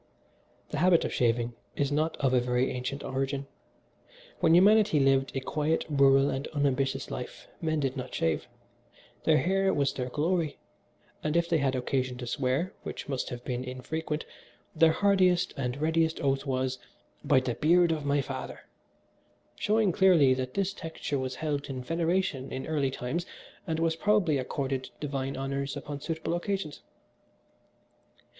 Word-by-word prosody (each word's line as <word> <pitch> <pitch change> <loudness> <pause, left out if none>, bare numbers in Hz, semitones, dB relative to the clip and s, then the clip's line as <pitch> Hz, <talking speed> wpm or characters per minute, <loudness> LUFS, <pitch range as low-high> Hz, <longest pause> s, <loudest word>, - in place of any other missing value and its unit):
"The 150 - -2
habit 175 0 +4
of - - -3
shaving 120 0 +1 0.2
is 140 0 0
not 155 +3 0
of 135 -2 +1
a 125 - +5
very 125 +1 +1
ancient 125 +3 -4
origin. 135 +1 -2 0.9
When 165 0 +5
humanity 205 -2 +5
lived 135 0 +2
a - - +1
quiet, 155 +4 0
rural 135 -1 +5
and 135 +1 -3
unambitious 135 -2 0
life, 125 - -7
men 155 -2 0
did 135 -1 -1
not 130 - -5
shave: 80 -2 -1 0.8
their 160 -1 +5
hair 195 +3 +2
was 140 -4 +1
their 125 -1 -3
glory, 160 +3 0 0.7
and 155 +2 +1
if 170 0 +2
they 165 -2 +2
had 135 -2 +1
occasion 130 0 -1
to 125 - -6
swear, 130 +8 -1
which - - -6
must 135 -3 -2
have 120 0 -7
been 125 0 -2
infrequent, 150 +5 -4 0.5
their 160 0 +5
hardiest 185 -2 +3
and 125 -2 -2
readiest 160 +1 +1
oath 135 0 0
was, 130 -1 -1 0.4
'by 130 - +4
the 130 -2 -2
beard 170 +5 +4
of 155 -2 -1
my 145 0 +2
father,' 130 -1 -6 0.9
showing 215 -2 +2
clearly 165 -8 +5
that 130 0 -4
this 195 0 0
texture 160 -5 -4
was 130 0 -3
held 145 -2 -3
in 130 -2 -4
veneration 165 -3 -1
in 130 0 -4
early 145 -4 0
times 135 +7 -3 0.4
and 160 -1 -1
was 165 -1 +1
probably 180 -6 +2
accorded 130 0 -3
divine 135 -2 -3
honours 140 +1 -3
upon 145 -1 -6
suitable 160 +1 -3
occasions. 175 -3 -3
140 Hz, 155 wpm, -29 LUFS, 130-165 Hz, 0.9 s, a